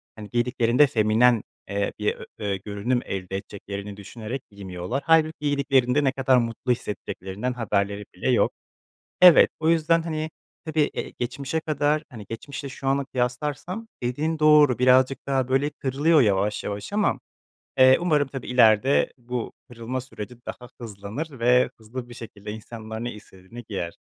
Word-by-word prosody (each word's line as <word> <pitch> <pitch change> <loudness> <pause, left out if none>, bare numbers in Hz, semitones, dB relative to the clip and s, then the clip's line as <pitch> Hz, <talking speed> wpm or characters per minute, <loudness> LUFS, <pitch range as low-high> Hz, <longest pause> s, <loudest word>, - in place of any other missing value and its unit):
hani, 105 -2 -9
giydiklerinde 120 +2 +3
feminen, 115 -1 +3 0.3
eee, 100 0 -1
bir 105 - 0
ö - - -10
ö 100 -2 -2
görünüm 105 +5 -2
elde 95 -1 -4
edeceklerini 100 0 -7
düşünerek 110 +5 -6
giymiyorlar. 100 +6 -5
Hâlbuki 160 0 +4
giydiklerinde 140 -2 +2
ne 135 - +3
kadar 130 -1 +3
mutlu 120 +1 -1
hissedeceklerinden 105 +1 -4
haberleri 105 -3 -1
bile 90 - -2
yok. - - +3 0.7
Evet, 180 -2 +9
o 160 0 +1
yüzden, 165 0 +3
hani, 155 -1 -3 0.4
tabii, 155 -1 0
eee, - - -5
geçmişe 135 +5 -2
kadar, 150 -1 0
hani, 110 -6 -10
geçmişle 140 +4 -6
şu 135 0 -7
anı 135 +1 +1
kıyaslarsam 145 - -3 0.2
dediğin 150 +6 -1
doğru 150 -4 +6
birazcık 130 +2 +3
daha, 135 -2 +1
böyle, 135 +3 +1
kırılıyor 145 +3 +2
yavaş 105 -2 +1
yavaş 100 - -5
ama, 210 0 +1 0.6
eee, 130 0 +7
umarım 150 -5 +2
tabii, 135 -2 -7
ileride 125 +1 +4
bu 125 -1 -5 0.2
kırılma 120 +2 -4
süreci 125 -2 -9
daha 125 -1 -8
hızlanır 115 +7 -6
ve 125 +2 +4
hızlı 120 +3 -8
bir - - -9
şekilde 105 -3 -9
insanlar 110 +1 -7
ne 120 - -4
istediğini 105 +2 -12
giyer. 85 -5 -4
125 Hz, 150 wpm, -25 LUFS, 105-140 Hz, 0.7 s, Evet